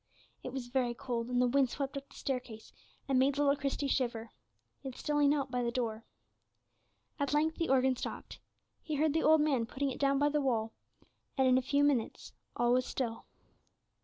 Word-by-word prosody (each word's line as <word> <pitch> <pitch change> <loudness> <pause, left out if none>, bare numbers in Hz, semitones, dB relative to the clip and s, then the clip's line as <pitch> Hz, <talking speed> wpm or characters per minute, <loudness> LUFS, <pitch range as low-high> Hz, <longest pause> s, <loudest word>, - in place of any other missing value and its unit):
It 255 - -6
was 260 -1 -5
very 245 -2 0
cold, 235 -2 -3
and 250 0 0
the 250 - +4
wind 265 +1 +3
swept 275 +2 -4
up 275 0 -7
the - - -17
staircase, 250 -5 -5 0.3
and 265 -2 +2
made 270 +1 +2
little 285 -1 +3
Christie 280 0 -2
shiver. 235 -4 -1 0.5
Yet 265 -3 -7
still 295 -1 -1
he 290 - +5
knelt 280 -2 +1
by 250 0 0
the 240 - 0
door. 230 -2 -3 1.1
At 285 +1 0
length 315 +2 +1
the 330 - -1
organ 260 0 +3
stopped; - - -7 0.4
he 310 - -4
heard 300 0 +2
the 320 - +1
old 315 0 +5
man 270 -7 +1
putting 275 +2 -2
it - - -7
down 275 -1 +2
by 290 +1 +3
the 295 0 0
wall, 225 -5 0 0.6
and 265 -1 +4
in 255 0 +5
a - - -3
few 280 +2 +1
minutes 275 -6 0 0.2
all 240 0 +2
was 255 0 +1
still. 230 -4 -3
265 Hz, 200 wpm, -32 LUFS, 245-285 Hz, 1.1 s, he